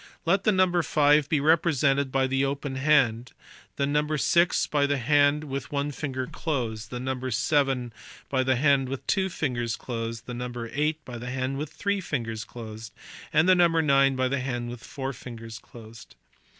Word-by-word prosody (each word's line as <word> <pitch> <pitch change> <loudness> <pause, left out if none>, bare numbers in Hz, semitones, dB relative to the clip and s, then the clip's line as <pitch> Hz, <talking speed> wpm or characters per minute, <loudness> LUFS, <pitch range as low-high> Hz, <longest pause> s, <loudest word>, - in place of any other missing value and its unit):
Let 195 +4 +2
the 215 - +5
number 185 -2 +3
five 150 -2 +3
be 150 - +2
represented 140 -3 +2
by 135 0 +2
the 135 +1 0
open 140 0 -2
hand 130 -5 +2 0.4
the 140 - 0
number 150 +2 0
six 170 +4 +3
by 145 -1 +1
the 145 0 +1
hand 145 +3 +3
with 140 -2 -5
one 145 0 -1
finger 130 -2 -4
closed; 115 -8 -3
the 125 - -5
number 130 0 -3
seven 125 0 +1 0.3
by 130 -2 0
the 130 0 +2
hand 135 0 +2
with 135 0 -5
two 190 -1 +1
fingers 120 -9 -2
closed; 115 -2 -5
the 125 - -6
number 120 -1 -5
eight 150 +1 -1
by 120 -2 -7
the 125 +1 -6
hand 130 +1 -2
with 150 0 -5
three 200 +3 -1
fingers 115 -9 -3
closed 110 -3 -9
y - - -24 0.3
and 160 +3 +3
the 185 - +7
number 170 -2 +3
nine 135 -2 +4
by 130 0 +1
the 135 +1 -1
hand 120 -2 -3
with 120 -1 -9
four 135 -2 -5
fingers 115 -3 -9
closed. 115 -1 -14
135 Hz, 190 wpm, -26 LUFS, 120-150 Hz, 0.4 s, the